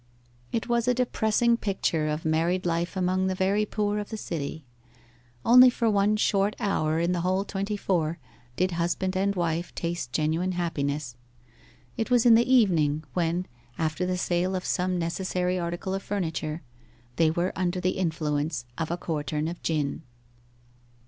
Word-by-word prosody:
It 225 - -2
was 235 0 +1
a 250 - +3
depressing 235 -1 +2
picture 180 -7 -1
of 150 +1 -3
married 170 +4 +1
life 170 +2 -1
among 185 +1 +1
the 190 - -1
very 200 +3 +1
poor 210 0 -1
of 205 - -6
a 220 - -3
city. 160 -5 -5 0.8
Only 250 +2 +9
for 235 -2 +1
one 205 +1 +3
short 205 -1 +2
hour 160 -5 0
in 170 +1 +1
the 175 -1 0
whole 185 +3 0
twenty 200 +1 -3
four 170 -5 0 0.4
did 185 +1 +1
husband 175 +2 -1
and 200 +1 +1
wife 170 -1 -2
taste 170 -7 -3
genuine 160 +6 0
happiness. 145 -7 -2 0.8
It 225 - -1
was 245 -2 +4
in 235 - +8
the 235 +3 +4
evening, 160 - +3
when, 175 +1 0 0.3
after 160 +3 -1
the 180 0 -1
sale 180 +1 0
of 180 - -3
some 180 0 0
necessary 180 +1 -1
article 175 +3 -3
of 195 - -2
furniture, 160 -5 -3 0.5
they 165 -1 +4
were 175 +3 -1
under 180 0 -1
the 185 +1 +1
influence 150 -5 -1
of 165 - -2
a 170 - -1
quartern 155 -2 -2
of 170 +1 -6
gin. 150 -4 -1
180 Hz, 160 wpm, -27 LUFS, 160-200 Hz, 0.8 s, Only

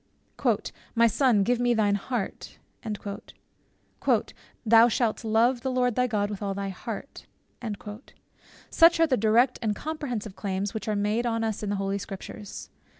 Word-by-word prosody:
"My 230 0 +5
son, 235 -2 +3
give 245 +3 +1
me 245 -1 +2
thine 210 -2 +2
heart" 205 +1 -4 2.1
"Thou 230 +1 +7
shalt 235 -1 0
love 230 +3 +2
the 265 - -2
Lord 250 -1 +1
thy 250 +2 +1
God 210 -2 -1
with 205 - -6
all 200 -1 -2
thy 200 0 -3
heart:" 220 +7 -7 1.4
Such 335 0 +6
are 330 - +6
the 285 -5 +2
direct 235 +4 +3
and 215 -3 0
comprehensive 250 -10 -4
claims 195 +1 -3
which 220 - -5
are 215 - 0
made 210 +4 0
on 230 -1 0
us 220 -2 -2
in 210 - -3
the 205 - 0
holy 195 0 -1
Scriptures. 200 +1 -8
225 Hz, 150 wpm, -27 LUFS, 205-245 Hz, 2.1 s, Thou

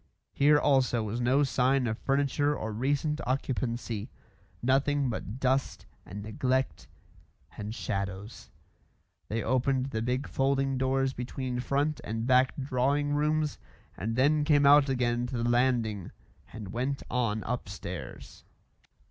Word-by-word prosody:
Here 145 +1 +5
also 130 -5 +2
was 110 +3 -3
no 130 +4 +3
sign 135 -1 +2
of 110 -2 -1
furniture 145 +1 +1
or 110 - -4
recent 145 +6 0
occupancy; 120 -4 -2 0.5
nothing 135 +1 +2
but 110 +2 -5
dust 130 +1 0 0.2
and 100 +3 -7
neglect 130 +5 -1 0.7
and 105 +2 -5
shadows. 100 0 -4 0.8
They 115 +1 -2
opened 130 +1 +1
the 110 - -2
big 125 +4 -1
folding 135 0 0
doors 135 0 +1
between 125 0 -4
front 140 +4 0
and 115 +1 -3
back 130 0 +4
drawing 140 +2 0
rooms 150 0 0 0.4
and 115 +2 -3
then 145 +4 +3
came 145 -2 +4
out 145 0 +7
again 120 -2 0
to 125 - -4
the 115 0 0
landing 120 -5 +1 0.4
and 105 -4 -8
went 130 +4 -2
on 115 -4 0
upstairs. 125 +1 -6
130 Hz, 130 wpm, -29 LUFS, 120-140 Hz, 0.8 s, out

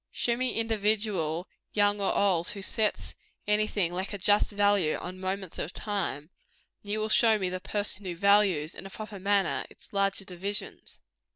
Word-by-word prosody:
Show 235 - 0
me 255 +1 -1
the - - -2
individual, 210 -6 0 0.3
young 205 0 +2
or 195 - +2
old, 180 -4 +2
who 200 -2 -6
sets 215 +2 -1 0.3
any 210 +1 +2
thing 180 -5 -1
like 190 +3 -3
a - - -3
just 205 +2 +3
value 205 -5 +3
on 185 +1 -6
moments 190 -1 -4
of 160 - -3
time, 185 -7 -3 0.5
and 205 - -8
you 215 - 0
will 215 - -1
show 220 0 +4
me 190 -3 -1
the 185 0 -4
person 205 0 -2
who 180 -2 -3
values, 190 -4 +3
in - - -8
a - - -11
proper 215 0 -8
manner, 200 0 +1
its - - -13
larger 195 0 +1
divisions. 195 +3 -5
200 Hz, 185 wpm, -28 LUFS, 185-210 Hz, 0.5 s, show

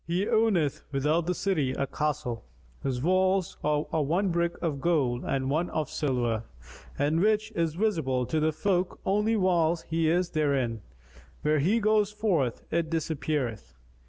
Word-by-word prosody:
He 175 +4 0
owneth 195 -10 +2
without 150 +5 +1
the 180 - 0
city 155 -11 0
a 140 - -1
castle, 150 -5 -2 0.4
whose 130 -2 -2
walls 185 +1 +2
are 150 0 +1 0.2
one 175 +7 +1
brick 170 0 -1
of 150 -5 -2
gold 135 -8 +1
and 135 -1 -1
one 160 +6 0
of 155 -1 -2
silver 120 -6 0 0.6
and 150 +3 +1
which 215 +2 +2
is 165 -6 -1
visible 160 - 0
to 155 - -1
the 155 +1 +2
folk 180 +2 -1
only 210 +3 +2
whilst 175 -4 +2
he 165 0 +1
is 175 +1 +1
therein: 135 -7 0 0.6
when 150 0 +2
he 195 +11 +2
goeth 210 -1 +2
forth, 180 - 0
it 165 -1 0
disappeareth. 140 - -2
160 Hz, 155 wpm, -28 LUFS, 140-185 Hz, 0.6 s, owneth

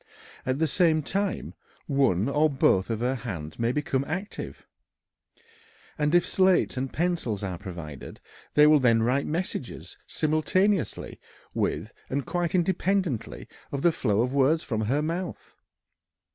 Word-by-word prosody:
At 130 +1 +1
the 160 - +2
same 160 -1 +2
time 195 +4 -2 0.3
one 135 - +2
or 150 +3 +3
both 120 -8 +2
of 115 -1 -2
her 125 +2 +1
hands 95 -12 -6
may 115 +1 +1
become 145 -1 -1
active, 185 +6 -5 1.3
and 150 +2 +1
if 175 - +4
slates 185 -5 +3
and 130 +1 -3
pencils 165 - -1
are 90 -3 -4
provided 85 -7 -8 0.4
they 150 - +7
will 150 0 +6
then 115 -3 +3
write 130 +4 +1
messages 160 -5 -4
simultaneously 165 +5 0 0.3
with - - -2 0.2
and 140 0 -2
quite 175 0 -1
independently 180 - 0 0.2
of 140 -1 -3
the 170 - +5
flow 110 -9 +1
of 125 +2 -1
words 140 +4 +3
from 110 -5 -2
her 140 +7 +1
mouth. 170 +3 -4
140 Hz, 140 wpm, -27 LUFS, 120-170 Hz, 1.3 s, they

